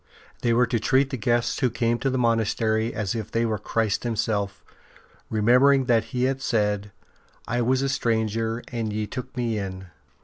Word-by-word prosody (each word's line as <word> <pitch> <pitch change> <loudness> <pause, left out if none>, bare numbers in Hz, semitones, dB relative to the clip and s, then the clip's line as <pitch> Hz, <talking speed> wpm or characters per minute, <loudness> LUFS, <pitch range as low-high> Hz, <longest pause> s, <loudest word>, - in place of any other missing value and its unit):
They 120 - +1
were 120 +2 +4
to 115 -1 -1
treat 135 +5 +2
the - - -1
guests 120 0 0
who 130 - +2
came 120 0 0
to 135 - 0
the 130 - -1
monastery 115 -1 +1
as 100 -3 -2
if 110 -3 -4
they 115 +1 0
were 110 -2 -1
Christ 110 0 -1
Himself, 110 -4 -2 0.7
remembering 125 +5 +4
that 115 -3 +2
He 125 +2 -2
had 135 +1 0
said, 105 -4 0 0.3
'' - - -31
I 120 +1 0
was 130 +3 +2
a - - +1
stranger 115 -2 -1
and 115 -3 -2
ye 105 0 -2
took 125 +3 -7
Me 115 -3 -1
in.'' 95 -2 -6
115 Hz, 190 wpm, -25 LUFS, 110-125 Hz, 0.7 s, were